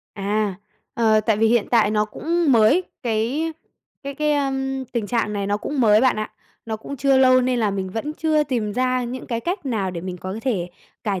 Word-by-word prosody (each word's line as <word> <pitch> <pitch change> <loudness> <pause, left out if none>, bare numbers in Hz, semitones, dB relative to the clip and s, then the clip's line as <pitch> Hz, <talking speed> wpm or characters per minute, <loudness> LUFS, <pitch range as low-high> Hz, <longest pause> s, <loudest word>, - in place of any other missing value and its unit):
À, 205 0 -1 0.4
ờ, 220 -2 +3
tại 215 0 +1
vì 225 +1 +3
hiện 230 -1 +2
tại 225 -3 +4
nó 210 0 +2
cũng 325 +8 0
mới, 235 +10 +5 0.2
cái 245 +8 -1 0.5
cái 280 0 -5
cái, 300 +1 +1
ưm, 270 -1 -1
tình 235 -3 -3
trạng 225 -1 0
này 200 -1 -2
nó 205 +1 +1
cũng 280 +6 -3
mới 215 -3 +5
bạn 260 -2 +3
ạ, 215 0 -3 0.4
nó 220 -1 -3
cũng 280 +6 -8
chưa 270 0 +3
lâu 255 -1 +6
nên 250 -1 0
là 215 -2 +2
mình 190 -1 -3
vẫn 225 +9 -4
chưa 310 -1 +1
tìm 235 -7 -2
ra 255 +1 0
những 250 +2 -6
cái 230 -2 -2
cách 345 - -3
nào 210 -7 -1
để 175 -2 -5
mình 180 +1 -5
có 185 +2 -6
thể 195 -10 -1 0.4
cải 200 -4 -1
235 Hz, 220 wpm, -22 LUFS, 210-270 Hz, 0.5 s, lâu